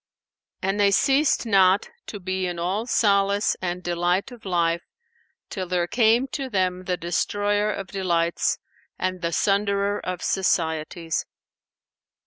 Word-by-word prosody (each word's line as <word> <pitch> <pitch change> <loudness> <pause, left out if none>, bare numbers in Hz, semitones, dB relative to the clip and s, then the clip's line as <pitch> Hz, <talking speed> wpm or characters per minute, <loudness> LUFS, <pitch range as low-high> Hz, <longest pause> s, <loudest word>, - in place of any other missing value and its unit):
And 195 +2 0
they 200 -1 +5
ceased 270 +8 +3
not 195 -2 +4 0.2
to 205 - -6
be 185 0 -2
in 175 -1 -4
all 190 +7 -2
solace 200 -2 +2
and 180 0 -3
delight 175 +6 0
of 235 -3 -13
life, 170 -2 +1 0.7
till 185 -2 -5
there 175 -1 0
came 230 +5 +3
to 270 0 -4
them 185 -3 -1
the 180 -1 -1
Destroyer 205 +5 0
of 195 -1 -4
delights 170 -3 0 0.4
and 185 -1 -2
the 170 -1 -1
Sunderer 200 +1 +1
of 185 -1 -4
societies. 165 -2 -1
190 Hz, 130 wpm, -24 LUFS, 175-205 Hz, 0.7 s, they